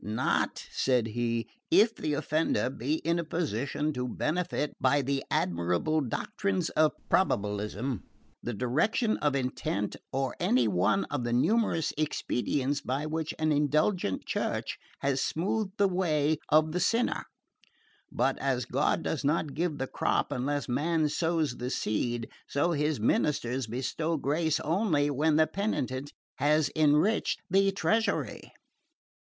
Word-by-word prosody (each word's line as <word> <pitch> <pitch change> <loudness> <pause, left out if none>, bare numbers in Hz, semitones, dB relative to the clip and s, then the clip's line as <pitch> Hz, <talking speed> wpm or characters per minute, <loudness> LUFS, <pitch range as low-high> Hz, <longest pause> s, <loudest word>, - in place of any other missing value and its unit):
"Not," 110 +2 -1
said 125 -4 +1
he, 115 0 -1 0.2
"if 220 +2 +5
the 150 -7 -2
offender 155 -3 0
be 135 +4 -1
in 170 +1 +2
a - - -1
position 150 -2 -2
to 125 -1 -2
benefit 155 +2 -1
by 135 +2 +3
the 135 +1 -1
admirable 90 - +1
doctrines 180 - -2
of 155 0 +3
probabilism, 105 - 0 0.4
the 120 -1 -4
direction 155 - +1
of 145 -2 +1
intention, 125 -6 -2
or 135 0 -1
any 125 -2 +3
one 105 - +2
of 145 -4 -1
the 120 - -2
numerous 165 - +2
expedients 140 -1 -1
by 135 +3 -2
which 160 0 -3
an 155 0 +1
indulgent 150 - +1
Church - - -2 0.2
has 135 -1 +1
smoothed 195 +4 -1
the 200 - +4
way 155 -5 +1
of 155 +1 +4
the 180 - -1
sinner; 230 +7 +1 0.9
but - - 0
as - - 0
God - - +1
does 150 - -2
not 150 0 0
give 165 -1 -1
the 135 - -1
crop - - 0
unless 140 +1 -1
man 155 +4 +1
sows 160 -4 0
the 125 +1 -3
seed, 120 0 -1 0.2
so 145 +5 +1
His 150 -3 0
ministers 125 +1 +1
bestow 155 +7 -2
grace 155 +2 0
only 160 -4 +1
when 150 +3 +2
the 160 +1 +5
penitent 145 - -2 0.3
has 150 +1 +2
enriched 155 +7 +3
the 195 +1 +4
treasury. 220 +3 -1
150 Hz, 135 wpm, -29 LUFS, 125-165 Hz, 0.9 s, if